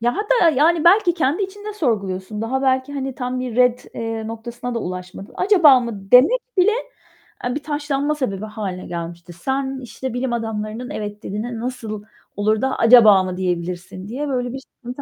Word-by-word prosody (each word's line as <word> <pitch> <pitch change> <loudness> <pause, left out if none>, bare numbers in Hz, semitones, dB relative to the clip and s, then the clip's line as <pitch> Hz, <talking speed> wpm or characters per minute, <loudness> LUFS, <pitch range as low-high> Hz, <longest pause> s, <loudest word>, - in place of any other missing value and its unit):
Ya 240 +1 0
hatta, 415 -4 +3
yani, 315 +3 +3
belki 355 0 +5
kendi 320 +3 0
içinde 410 +2 -6
sorguluyorsun; 210 - -2
daha 265 +4 -1
belki, 260 +1 +1
hani, 270 -2 -4
tam 255 -1 -3
bir 250 -3 -4
ret, 250 -1 +3
eee, 225 -1 -4
noktasına 235 +2 -6
da 230 - 0
ulaşmadı. 180 +1 -7
"Acaba 335 -10 +6
mı?" 205 -5 -7
demek 290 - +7 0.2
bile, 370 +3 +5 0.7
eee, 245 +2 -1
bir 290 - -4
taşlanma 290 0 -1
sebebi 215 -8 -3
hâline 200 -4 -5
gelmişti. 170 0 -7
"Sen, 265 +8 -2
işte, 245 +1 -6
bilim 245 0 -2
adamlarının 225 +1 -4
'Evet.' 210 0 -6
dediğine 225 +4 -4
nasıl 225 -4 -5 0.3
olur 215 +2 +1
da 265 0 0
'Acaba 225 -5 +7
mı?' 185 -1 -4
diyebilirsin?" 180 +1 -3
diye 270 +7 -4
böyle 250 -3 -2
bir 270 - -5
sıkıntı 255 0 -10
245 Hz, 170 wpm, -21 LUFS, 210-275 Hz, 0.7 s, demek